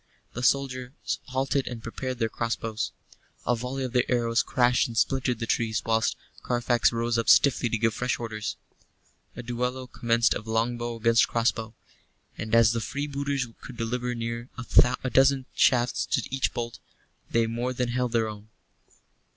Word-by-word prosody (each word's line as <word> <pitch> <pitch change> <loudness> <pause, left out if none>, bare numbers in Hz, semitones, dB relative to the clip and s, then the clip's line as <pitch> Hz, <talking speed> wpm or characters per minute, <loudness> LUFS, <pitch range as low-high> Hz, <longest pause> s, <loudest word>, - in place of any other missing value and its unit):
The 125 - -4
soldiers 130 0 -1
halted 135 +1 0
and 120 -2 -6
prepared 130 +2 -4
their 115 -1 +1
crossbows. 115 -1 -3 0.5
A 120 - +2
volley 125 +3 -4
of 125 -2 -4
their 125 0 +1
arrows 115 -1 +2
crashed 125 0 +2
and 115 -2 -7
splintered 130 0 +1
the 115 - -3
trees, 110 -1 0
whilst 110 -1 +1 0.3
Carfax 120 -1 +2
rose 115 0 0
up 115 - 0
stiffly 130 -3 +5
to 115 - 0
give 115 0 +1
fresh 125 +2 -1
orders. 110 -2 -4 0.8
A 120 - -7
duello 125 +2 -2
commenced 115 -1 +1
of 105 - -6
longbow 120 +1 -1
against 115 +1 +3
crossbow; 115 -1 -1 0.6
and 110 +1 -1
as 115 -1 +6
the 115 - -1
freebooters 140 0 -2 0.2
could 125 - -10
deliver 125 +1 -2
near 115 +1 -4 0.5
a 130 - 0
dozen 135 0 +4
shafts 125 -2 +2
to - - 0
each 135 0 0
bolt, 120 -1 -5 0.5
they 115 0 +2
more 120 +3 -2
than 125 -1 -1
held 125 0 -1
their 115 -1 +2
own. 105 0 -9
120 Hz, 160 wpm, -27 LUFS, 115-125 Hz, 0.8 s, as